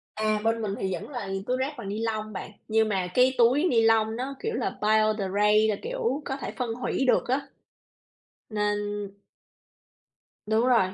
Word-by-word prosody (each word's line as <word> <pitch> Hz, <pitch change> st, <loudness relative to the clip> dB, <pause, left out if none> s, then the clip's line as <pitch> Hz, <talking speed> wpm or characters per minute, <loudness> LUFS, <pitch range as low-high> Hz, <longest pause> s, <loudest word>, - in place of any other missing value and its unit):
À, 215 Hz, 0 st, +1 dB
bên 225 Hz, 0 st, +1 dB
mình 200 Hz, -2 st, -2 dB
thì 190 Hz, -1 st, -1 dB
vẫn -, -, -6 dB
là 240 Hz, -8 st, -5 dB, 0.2 s
túi 255 Hz, -, +1 dB
rác 270 Hz, +3 st, -2 dB
bằng 215 Hz, -5 st, -6 dB
nilon 215 Hz, 0 st, -3 dB
bạn, 195 Hz, -, -6 dB, 0.2 s
nhưng 220 Hz, 0 st, +2 dB
mà 190 Hz, -3 st, 0 dB
cái 255 Hz, +1 st, +4 dB
túi 245 Hz, +6 st, +4 dB
nilon 225 Hz, -7 st, +3 dB
nó 265 Hz, +3 st, -4 dB
kiểu 450 Hz, +1 st, -3 dB
là -, -, -1 dB
biodegrade 215 Hz, 0 st, +3 dB
là, 210 Hz, -, +1 dB
kiểu, 485 Hz, -, -2 dB
có 270 Hz, 0 st, -3 dB
thể -, -, -5 dB
phân 240 Hz, -3 st, -2 dB
hủy 255 Hz, +2 st, -1 dB
được -, -, +3 dB
á, 270 Hz, +3 st, 0 dB, 1.0 s
nên 210 Hz, -1 st, 0 dB, 1.7 s
Đúng 220 Hz, +2 st, +2 dB
rồi, 225 Hz, -7 st, +3 dB
225 Hz, 170 wpm, -27 LUFS, 215-255 Hz, 1.7 s, cái